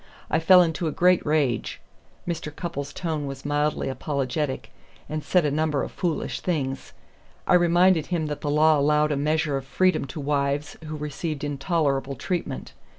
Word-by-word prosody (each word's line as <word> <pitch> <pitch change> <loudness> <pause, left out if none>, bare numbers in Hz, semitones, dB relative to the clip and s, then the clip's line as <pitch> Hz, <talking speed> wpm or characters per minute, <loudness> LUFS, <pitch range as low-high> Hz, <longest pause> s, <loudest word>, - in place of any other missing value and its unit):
I - - +3
fell 180 +2 +7
into 165 0 -1
a - - -1
great 180 +2 +3
rage" 145 -6 0 0.5
Mr. 170 -3 -3
Cupples' 145 -3 -5
tone 155 -5 -3
was 135 0 -7
mildly 145 +1 0
apologetic 135 +1 -2 0.4
"and 155 0 -4
said 180 -4 +2
a 145 - +1
number 150 -1 0
of - - -5
foolish 170 -4 -2
things. 135 -7 -3 0.5
I - - +3
reminded 175 -1 +4
him 170 -3 -1
that 150 -1 -4
the 145 - -2
law 155 +1 +4
allowed 150 +1 +3
a - - +1
measure 150 0 0
of 135 - -6
freedom 185 0 +2
to 140 +4 -7
wives 140 0 -1
who 155 0 -5
received 150 0 -4
intolerable 140 -2 0
treatment. 170 -7 -4
150 Hz, 165 wpm, -25 LUFS, 140-165 Hz, 0.5 s, fell